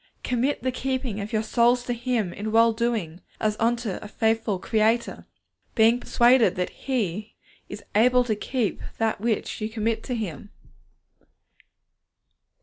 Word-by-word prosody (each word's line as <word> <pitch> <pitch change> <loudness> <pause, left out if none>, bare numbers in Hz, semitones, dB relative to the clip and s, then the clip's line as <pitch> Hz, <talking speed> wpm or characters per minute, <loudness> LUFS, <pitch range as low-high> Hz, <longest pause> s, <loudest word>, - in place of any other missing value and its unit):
Commit 250 +2 0
the 260 - +1
keeping 255 -4 -3
of 205 +2 -6
your 220 -1 0
souls 240 +2 +3
to 245 - -2
Him 235 -6 -1
in 215 +1 -4
well 230 +1 +5
doing, 220 -8 -2 0.2
as 215 -1 0
unto 230 -3 0
a - - -8
faithful 220 -1 0
Creator, 220 +4 0 0.5
being 225 +2 +5
persuaded 245 0 +4
that 180 0 -2
He 215 -6 -3 0.3
is 205 0 -8
able 250 +4 +4
to 225 -3 -1
keep 230 0 -2 0.2
that 220 -3 0
which 225 -1 -2
you 215 - -2
commit 225 0 -1
to 250 - -2
Him. 205 -3 -5
225 Hz, 145 wpm, -25 LUFS, 215-240 Hz, 0.5 s, well